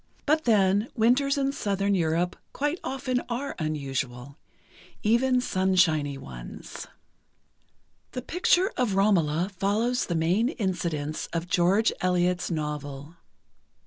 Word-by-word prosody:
But 310 +1 +2
then, 205 -1 +3
winters 255 +5 +3
in 275 0 +1
Southern 200 -5 0
Europe 175 0 +1 0.2
quite 295 +5 -1
often 260 -1 -1
are 260 +4 -3
unusual. 135 -4 -3 0.7
Even 250 +4 +3
sunshiny 180 - +2
ones. - - -9 1.3
The 250 - -4
picture 360 +4 +2
of 240 -6 +1
"Romola" 180 -4 +2
follows 215 +6 0
the 175 - -1
main 180 +9 +2
incidents 170 - -2
of 170 +1 -2
George 195 +4 +3
Eliot's 180 -1 +1
novel. 150 -2 -4
190 Hz, 110 wpm, -27 LUFS, 160-240 Hz, 1.3 s, then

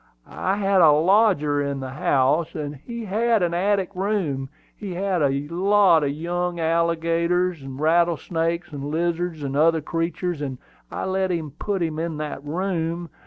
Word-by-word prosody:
"I 190 - -2
had 195 -2 +2
a 160 - +8
lodger 155 -2 +3
in 140 -1 -2
the 130 -1 -6
house, 140 +3 +1
and 145 -1 -4
he 230 - -7
had 220 +1 +1
an 170 -1 0
attic 195 +2 +1
room. 180 -9 -1 0.3
He 195 -4 -6
had 190 -2 0
a 140 0 0
lot 190 -2 +4
of 140 - +1
young 175 +4 -2
alligators, 170 +1 +1
rattlesnakes, 165 +3 0
lizards, 160 +3 -2
and 135 0 -3
other 160 +2 +4
critters; 165 +1 -2
and 135 -3 -4 0.3
I - - -4
let 190 0 0
him 165 -5 -2
put 195 +4 -2
'em 160 -1 -2
in 165 -1 -3
that 150 -2 -5
room. 170 +1 -2
170 Hz, 155 wpm, -23 LUFS, 150-185 Hz, 0.3 s, a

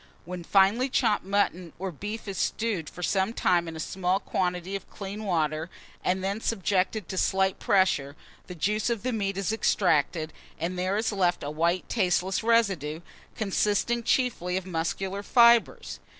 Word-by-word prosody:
When 180 0 -6
finely 200 +9 +3
chopped 220 -7 +1
mutton 185 -3 0
or 190 +1 -4
beef 210 +7 -6
is 195 -2 -4
steeped 205 -9 -1
for 180 - -9
some 195 +4 +1
time 175 -6 +2
in 165 - -6
a - - -7
small 185 +3 0
quantity 180 0 -2
of 195 - -7
clean 205 +2 -7
water, 160 -3 0 0.3
and 185 +1 0
then 200 +3 -2
subjected 195 -2 0
to 185 - -2
slight 190 0 +1
pressure, 170 -8 +2 0.3
the 180 - -8
juice 210 +7 0
of 230 -3 -2
the 255 0 -1
meat 195 -3 -2
is 200 +2 -1
extracted, 160 -6 +1 0.2
and 170 +3 -3
there 185 +2 0
is 220 +1 0
left 180 -4 +1
a 145 - -3
white 170 +4 0
tasteless 190 -3 +1
residue, 195 -10 +1 0.3
consisting 210 +3 0
chiefly 220 -8 0
of 190 - -4
muscular 185 +3 -2
fibres. 210 - +4
190 Hz, 165 wpm, -27 LUFS, 175-210 Hz, 0.3 s, fibres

